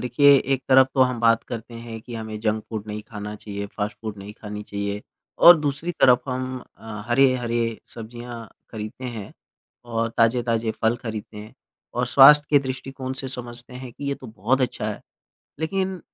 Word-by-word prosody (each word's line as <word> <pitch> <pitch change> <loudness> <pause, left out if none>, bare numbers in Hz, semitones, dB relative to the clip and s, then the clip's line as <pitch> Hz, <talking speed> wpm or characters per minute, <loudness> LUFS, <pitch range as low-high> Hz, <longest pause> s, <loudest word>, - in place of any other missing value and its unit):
देखिए, 140 +4 +5
एक 135 0 -1
तरफ 130 0 +7
तो 130 - +5
हम 125 -2 0
बात 115 -1 +4
करते 115 0 -7
हैं 115 -1 -8
कि 120 +1 -9
हमें 110 -1 -5
जंक 110 -1 -1
फूड 110 -1 -5
नहीं 105 0 -5
खाना 105 -1 -6
चाहिए, 100 -1 -6
फ़ास्ट 105 +1 -4
फ़ूड 110 -2 -5
नहीं 100 +2 -9
खानी 105 -1 -6
चाहिए 100 0 -4 0.4
और 175 0 +10
दूसरी 150 +4 -2
तरफ 125 -2 +6
हम 130 0 -3 0.2
अ, 105 -2 -8
हरे-हरे 120 -3 +2 0.2
सब्ज़ियाँ 120 0 -8 0.2
खरीदते 110 +3 -7
हैं 115 -5 -6 0.5
और 115 -1 -1
ताज़े-ताज़े 115 -1 +2
फल 115 +2 +3
खरीदते 110 -2 -6
हैं 105 +1 -10 0.4
और 125 0 0
स्वास्थ्य 145 +4 +8
के 145 - +7
दृष्टिकोण 130 0 -5
से 135 - -5
समझते 120 -1 -6
हैं 125 -1 -8
कि 145 - -9
ये 140 - 0
तो 130 - -12
बहुत 115 +5 0
अच्छा 120 -4 -1
है। - - -7 0.6
लेकिन 190 +2 -1
120 Hz, 180 wpm, -24 LUFS, 110-130 Hz, 0.6 s, और